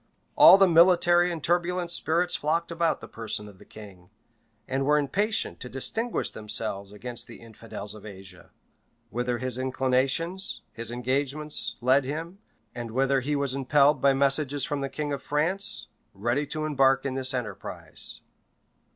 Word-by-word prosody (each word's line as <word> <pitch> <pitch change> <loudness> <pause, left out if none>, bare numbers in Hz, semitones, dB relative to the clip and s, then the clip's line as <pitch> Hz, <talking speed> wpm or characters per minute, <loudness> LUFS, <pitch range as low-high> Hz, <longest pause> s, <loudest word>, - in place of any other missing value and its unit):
All 190 - +9
the 195 -1 +6
military 175 0 +5
and 165 -3 -5
turbulent 175 0 0
spirits 170 +1 0
flocked 165 +3 -1
about 170 -1 0
the - - -9
person 110 -2 -5
of 100 -2 -15
the - - -15
king, 95 -4 -13 0.6
and 135 +1 -1
were 150 +2 +3
impatient 200 +10 0
to 125 - -6
distinguish 220 - -2
themselves 105 -2 -3
against 120 +3 -6
the - - -12
infidels 110 -2 -8
in 105 - -12
Asia; 95 -3 -11 0.6
whither 120 +1 -1
his 130 0 -3
inclinations, 130 +8 0
his 115 0 -5
engagements, 130 0 -1
led 130 +3 +4
him, 165 +7 -5 0.3
and 120 -1 -6
whither 135 +3 +2
he 145 +3 -1
was 140 -2 -1
impelled 140 +2 +3
by 140 - +5
messages 140 0 +1
from 145 -1 -3
the 135 - -2
king 145 0 -3
of 140 - -4
France, 150 - -1 0.3
ready 120 +8 -1
to 155 +1 -3
embark 135 -3 +3
in 135 - -1
this 130 0 -2
enterprise. 105 -7 -5
135 Hz, 155 wpm, -27 LUFS, 120-155 Hz, 0.6 s, All